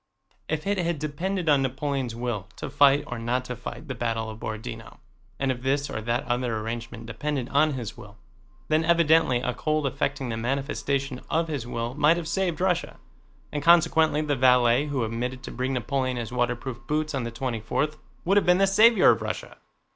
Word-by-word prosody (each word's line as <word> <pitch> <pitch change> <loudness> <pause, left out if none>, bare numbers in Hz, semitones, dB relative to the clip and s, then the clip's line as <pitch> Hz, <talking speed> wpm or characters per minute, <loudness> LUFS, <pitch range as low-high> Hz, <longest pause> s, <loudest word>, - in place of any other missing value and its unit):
If 155 -1 -2
it 200 -1 0
had 170 -2 0
depended 165 +5 -3
on 145 -2 +5
Napoleon's 135 -2 -2
will 115 -5 -3
to - - -6
fight 140 0 +5
or 120 -4 -5
not 125 +2 -1
to 125 - -5
fight 125 +5 -8
the 130 - -3
battle 115 -2 -2
of 110 - -10
Borodinó, 110 0 -6 0.4
and 135 -1 0
if 125 -1 -5
this 140 +2 0
or 110 - -3
that 120 +3 -1
other 120 -2 -1
arrangement 115 +1 -5
depended 130 +2 -3
on 150 +2 +3
his 120 -5 -5
will, 100 +1 -12 0.5
then 155 +1 +2
evidently 160 -6 +4
a 125 0 -1
cold 155 +4 -1
affecting 135 0 -2
the 115 - -3
manifestation 135 +2 -2
of 165 0 0
his 140 -6 -3
will 115 0 -3
might 150 +4 +4
have 170 -2 -4
saved 180 -4 -1
Russia, 180 -1 0 0.5
and 145 - -2
consequently 160 -1 +4
the 145 -1 0
valet 125 +1 +4
who 140 -4 -1
omitted 125 +3 -3
to - - -7
bring 130 +2 -2
Napoleon 130 0 -1
his 120 -1 -4
waterproof 120 0 -2
boots 155 0 -1
on 135 -3 -1
the 115 - -3
twenty 115 0 -3
fourth 150 +8 -1 0.3
would 195 +3 +3
have 205 - +4
been 180 0 +6
the 195 - +4
savior 220 +4 +6
of - - -1
Russia. - - -5
135 Hz, 195 wpm, -26 LUFS, 120-155 Hz, 0.5 s, been